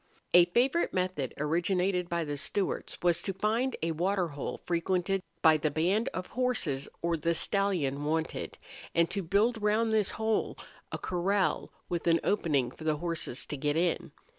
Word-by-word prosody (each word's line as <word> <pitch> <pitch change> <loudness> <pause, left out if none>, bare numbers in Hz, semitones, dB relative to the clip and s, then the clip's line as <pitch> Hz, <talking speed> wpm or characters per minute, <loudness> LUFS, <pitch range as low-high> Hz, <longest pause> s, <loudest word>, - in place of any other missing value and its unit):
A 175 0 +8
favorite 250 - +1
method 180 -8 -1
originated 180 +4 0
by 170 -1 0
the 145 -1 -3
Stewarts 190 +7 -2
was 175 -1 +3
to 195 - -2
find 225 +6 0
a 165 - +1
water 180 +2 0
hole 145 -1 -5
frequented 180 +2 0 0.2
by 160 -2 +7
the 155 0 0
band 180 +9 +1
of 185 - -4
horses 220 - -1
or 170 0 +2
the 165 +1 0
stallion 170 -9 0
wanted, 160 +2 -2 0.4
and 170 0 +3
to 200 - -1
build 210 +6 +1
round 220 +2 +2
this 215 -3 +3
hole 220 -1 0 0.3
a - - -2
corral 190 +2 0 0.2
with 175 -1 -3
an 165 0 +5
opening 145 -11 +1
for 155 - -12
the 155 -1 +1
horses 165 -5 -2
to - - -5
get 145 +2 0
in. 175 +1 0
175 Hz, 165 wpm, -30 LUFS, 160-200 Hz, 0.4 s, A